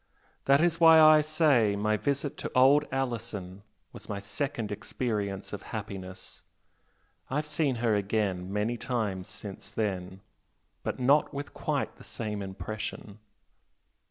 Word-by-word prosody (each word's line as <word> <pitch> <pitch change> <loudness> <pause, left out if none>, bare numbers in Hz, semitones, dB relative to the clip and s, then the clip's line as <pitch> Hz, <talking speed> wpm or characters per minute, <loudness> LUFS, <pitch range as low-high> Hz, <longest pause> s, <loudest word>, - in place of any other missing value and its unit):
That 140 +2 +5
is 170 -1 +2
why 165 -1 +8
I 155 0 +8
say 150 -9 +3
my 105 +1 +1
visit 140 +6 -1
to - - -5
old 140 +4 +6
Alison 115 -8 -3 0.3
was - - -11
my 105 - -2
second 120 +2 -3
experience 105 -3 -3
of 100 - -5 0.2
happiness. 95 -3 -8 0.9
I've 145 +3 -1
seen 150 -3 0
her 115 -1 +1
again 100 -3 -1
many 105 +4 -1
times 105 -8 -2
since 100 -2 -9
then, 95 -3 -3 0.6
but - - -4
not 140 +3 +3
with 145 +1 -5
quite - - -2
the - - -14
same 105 -2 -4
impression." 100 +1 -6
110 Hz, 130 wpm, -29 LUFS, 100-140 Hz, 0.9 s, why